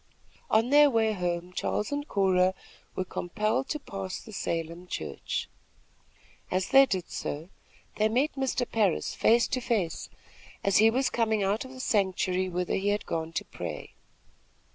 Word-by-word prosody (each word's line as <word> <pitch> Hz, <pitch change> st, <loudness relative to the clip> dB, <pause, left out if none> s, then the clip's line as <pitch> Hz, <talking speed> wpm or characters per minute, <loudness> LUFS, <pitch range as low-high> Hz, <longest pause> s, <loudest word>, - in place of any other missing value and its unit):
On 225 Hz, +4 st, +3 dB
their 295 Hz, 0 st, +7 dB
way 225 Hz, -3 st, +2 dB
home, 175 Hz, -1 st, -3 dB
Charles 210 Hz, +4 st, -1 dB
and 290 Hz, +1 st, -2 dB
Cora 190 Hz, -3 st, +3 dB, 0.4 s
were 185 Hz, -, -1 dB
compelled 215 Hz, +9 st, -1 dB
to 300 Hz, -, -2 dB
pass 195 Hz, -7 st, -5 dB
the 220 Hz, -, -12 dB
Salem 170 Hz, -1 st, -3 dB
church. -, -, -4 dB, 1.0 s
As 185 Hz, 0 st, 0 dB
they 270 Hz, 0 st, +7 dB
did 185 Hz, -6 st, -3 dB
so, 155 Hz, +5 st, -4 dB, 0.5 s
they 215 Hz, +1 st, +3 dB
met 260 Hz, +7 st, +1 dB
Mr. 265 Hz, -2 st, -1 dB
Parris 205 Hz, -7 st, +1 dB
face 235 Hz, +1 st, +4 dB
to 255 Hz, -, -1 dB
face, 210 Hz, -9 st, -1 dB, 0.5 s
as 200 Hz, -1 st, +3 dB
he 220 Hz, +2 st, +7 dB
was 255 Hz, +3 st, +1 dB
coming 220 Hz, -3 st, +1 dB
out 205 Hz, +5 st, 0 dB
of 260 Hz, -, -10 dB
the 260 Hz, -, -11 dB
sanctuary 185 Hz, -4 st, +1 dB
whither 180 Hz, 0 st, -2 dB
he 195 Hz, -, -2 dB
had 205 Hz, 0 st, 0 dB
gone 160 Hz, 0 st, -3 dB
to -, -, -2 dB
pray. -, -, -7 dB
205 Hz, 160 wpm, -28 LUFS, 180-240 Hz, 1.0 s, their